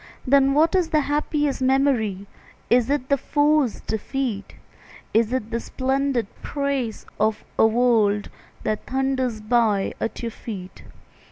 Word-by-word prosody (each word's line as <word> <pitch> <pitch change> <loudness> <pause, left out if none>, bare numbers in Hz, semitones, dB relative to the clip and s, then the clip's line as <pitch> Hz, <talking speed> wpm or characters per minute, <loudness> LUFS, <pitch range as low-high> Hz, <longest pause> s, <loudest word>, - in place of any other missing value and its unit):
Then 275 +1 +4
what 320 +2 +4
is 360 -4 +2
the 310 -2 +3
happiest 295 -1 -1
memory? 255 -7 +1 0.5
Is 245 0 +4
it 280 -3 0
the 280 -1 +2
foe's 295 -4 +2
defeat? 220 -1 -3 0.6
Is 225 +1 +3
it 245 -3 -2
the 230 - -1
splendid 265 -1 -1 0.2
praise 280 -6 -2
of 215 0 +1 0.2
a 220 - +7
world 220 -3 +2 0.3
That 215 - -2
thunders 260 -4 -1
by 215 -3 +1
at 225 - -3
your 230 - -2
feet? 190 -5 -8
255 Hz, 135 wpm, -23 LUFS, 220-280 Hz, 0.6 s, a